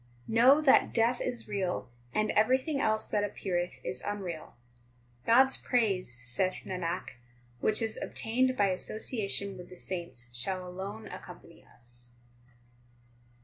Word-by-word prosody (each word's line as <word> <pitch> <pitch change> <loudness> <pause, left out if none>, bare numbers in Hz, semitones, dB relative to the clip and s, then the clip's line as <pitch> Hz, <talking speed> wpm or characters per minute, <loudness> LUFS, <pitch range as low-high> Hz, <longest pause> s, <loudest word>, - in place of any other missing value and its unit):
3 - - -6
Know 260 +6 +7
that 285 -3 +4
death 235 +2 +3
is 245 -2 -2
real, 195 -4 -2 0.2
and 215 - +1
everything 260 +6 +2
else 220 0 +2
that 205 -1 0
ap 205 - -3
peareth 175 -7 -2
is 125 0 -2
unreal. 190 -6 -5 0.7
God 240 +3 +8
s 265 0 0
praise, 195 - 0
saith 185 +11 0
Nanak, 180 -5 -4 0.4
which 215 - +3
is 220 -1 -2
obtained 255 +3 0
by 200 -1 +4
association 200 0 -1
with 180 - -10
the 180 - -11
saints 170 -11 -4
shall 185 +8 0
alone 195 +4 -6
accompany - - -11
us. 120 0 -1
200 Hz, 140 wpm, -30 LUFS, 180-225 Hz, 0.7 s, God